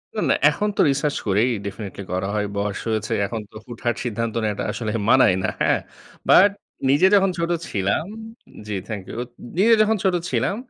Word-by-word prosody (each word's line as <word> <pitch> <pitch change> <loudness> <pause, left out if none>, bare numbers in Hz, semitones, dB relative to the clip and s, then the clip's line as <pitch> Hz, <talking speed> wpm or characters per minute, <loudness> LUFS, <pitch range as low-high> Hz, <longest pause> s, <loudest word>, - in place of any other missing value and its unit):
না, - - -1
না। - - +5 0.2
এখন 210 - -1
তো - - +4
রিসার্চ 140 +2 -1
করেই 105 +6 +3 0.2
definitely 100 -1 -6
করা 95 +1 -1
হয় 105 -1 0
বয়স 100 0 -2
হয়েছে 110 -1 -1
এখন 110 +2 -4
তো - - -20
হুটহাট 120 -1 -3
সিদ্ধান্ত 115 -1 -2
নেয়াটা 105 -1 -1
আসলে 110 -3 -3 0.2
মানায় 105 -8 +5
না। - - +1
হ্যাঁ? - - +3 0.5
But 200 +3 +8 0.4
নিজে 145 +8 +5
যখন 195 -1 +4
ছোট 170 +1 -1 0.2
ছিলাম 100 - 0 0.6
জি 105 - -3
থ্যাংক 105 -4 -5
ইউ - - -7 0.4
নিজে 225 +4 +5
যখন 220 +1 +3
ছোট 190 -2 +2 0.2
ছিলাম, 130 - 0
115 Hz, 180 wpm, -22 LUFS, 105-155 Hz, 0.6 s, But